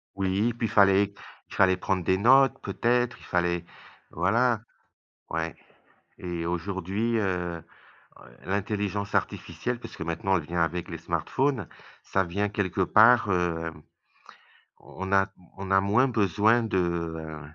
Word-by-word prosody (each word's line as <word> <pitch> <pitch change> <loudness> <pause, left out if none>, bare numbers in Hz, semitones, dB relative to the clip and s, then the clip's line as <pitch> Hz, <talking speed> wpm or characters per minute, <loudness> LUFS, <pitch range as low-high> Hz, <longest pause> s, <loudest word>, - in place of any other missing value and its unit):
Oui, 100 +4 0
puis 115 -1 -2
fallait 100 -2 +4 0.4
fallait 95 -2 +3
prendre 95 -1 -1
des 95 +2 +2
notes 135 +5 +5
peut-être, 120 +4 0
il - - -17
fallait 85 -1 0 0.5
voilà, 110 +6 +1 0.7
ouais. 80 0 -2 0.6
Et 85 -2 -5
aujourd'hui, 95 +6 -2
heu 90 -5 -2 0.6
heu, - - -16
l'intelligence 100 0 -2
artificielle, 100 +9 -2
puisque - - -10
maintenant 85 +4 0
elle 80 - -5
vient 85 +2 -2
avec 85 +1 -1
les 85 - -5
smartphones, 100 - -1 0.4
ça 95 - 0
vient 100 +4 -2
quelque 95 -2 -2
part, 110 +4 +5
hem, 80 -3 -1 1.0
on 95 0 -8
a 95 +1 +4 0.3
on 95 0 -6
a 95 0 +5
moins 110 +7 +3
besoin 110 +1 +2
de, 105 -4 -1
heu, 80 -3 -3
95 Hz, 130 wpm, -27 LUFS, 85-105 Hz, 1.0 s, notes